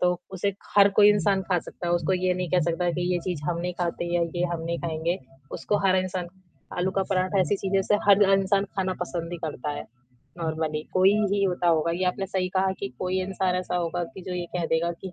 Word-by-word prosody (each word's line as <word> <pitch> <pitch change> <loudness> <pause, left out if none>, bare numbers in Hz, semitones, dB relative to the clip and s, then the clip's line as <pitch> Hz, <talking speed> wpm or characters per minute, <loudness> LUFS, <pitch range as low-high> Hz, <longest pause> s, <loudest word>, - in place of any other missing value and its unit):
तो 180 0 +3 0.2
उसे 195 +1 -1 0.2
हर 200 0 +8
कोई 205 - +9
इंसान 200 -1 +2
खा 185 -1 +1
सकता 175 - -8
है, - - +1
उसको 175 +2 0
ये 185 0 +1
नहीं 180 -1 -3
कह 180 - +3
सकता 175 +1 +1
कि 175 +1 -2
ये 175 - +1
चीज़ 175 -5 -3
हम 170 - -1
नहीं 180 +1 -2
खाते 170 0 -1
या 175 - +3
ये 175 - 0
हम 170 - -3
नहीं 170 0 -2
खाएँगे 165 +2 -2 0.4
उसको 205 - 0
हर 190 0 +4
इंसान 185 -1 -2 0.5
आलू 180 +1 +1
का - - +3
पराठा 185 +1 +2
ऐसी 200 +2 +1
चीज़ 195 0 -3
है 195 - +5
जिसे 210 - +2
हर 200 0 +7 0.2
इंसान 195 +1 +2
खाना 190 -1 0
पसंद 175 -1 -4
ही - - -3
करता 150 -2 -4
है - - -5 0.5
नॉर्मली 160 -2 -2
कोई 190 +2 +5 0.2
ही 200 0 +1
होता 180 -2 0
होगा 165 0 +3
ये 185 +2 -1
आपने 185 +2 -1
सही 185 -1 -1
कहा 190 0 +2
कि 130 - -2
कोई 185 +1 -1
इंसान 185 -1 -1
ऐसा 180 0 -2
होगा 175 0 -1
कि 190 - -9
जो 180 0 -5
ये 175 -1 -3
कह 170 -2 -1
देगा 170 +1 +1
कि 190 - -7
180 Hz, 240 wpm, -26 LUFS, 170-190 Hz, 0.5 s, कोई